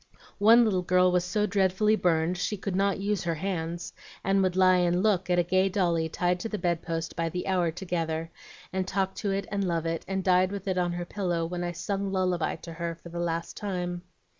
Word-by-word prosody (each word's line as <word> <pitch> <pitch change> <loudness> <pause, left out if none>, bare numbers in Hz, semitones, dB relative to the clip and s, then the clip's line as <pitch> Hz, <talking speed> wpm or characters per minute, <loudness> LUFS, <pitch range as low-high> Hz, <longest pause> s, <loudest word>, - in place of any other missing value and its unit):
One 225 +4 +7
little 190 -4 +1
girl 180 0 +3
was 180 -1 +2
so 210 +4 0
dreadfully 200 +2 +2
burned 170 -2 +1
she 210 - -1
could 195 -1 -3
not 200 +1 +2
use 200 0 -1
her 170 -1 -1
hands, 170 -1 -3 0.3
and 195 +1 +2
would 185 -1 +1
lie 185 -1 +5
and 175 +1 +2
look 190 -4 +2
at 180 - +3
a 175 - +4
gay 185 +3 +2
dolly 170 -4 +1
tied 180 +2 0
to 225 - -4
the 210 - -3
bedpost 165 -2 -2
by 165 0 -1
the 180 +2 -4
hour 180 -3 +1
together, 165 -2 -3 0.4
and 190 -1 -1
talk 190 0 0
to 205 - -2
it 195 0 -1
and 200 -1 0
love 170 -3 -1
it, 165 0 -2
and 190 0 -2
died 185 0 +3
with 200 -1 -6
it 185 -1 +1
on 175 -1 0
her 175 0 -4
pillow 175 -4 -1
when 175 +1 -4
I 175 0 -2
'sung 195 +2 -3
lullaby' 185 -3 0
to 165 - -7
her 170 0 -4
for 170 +1 -13
the 170 +1 -5
last 170 -1 -2
time. 180 -3 -3
180 Hz, 225 wpm, -28 LUFS, 170-195 Hz, 0.4 s, One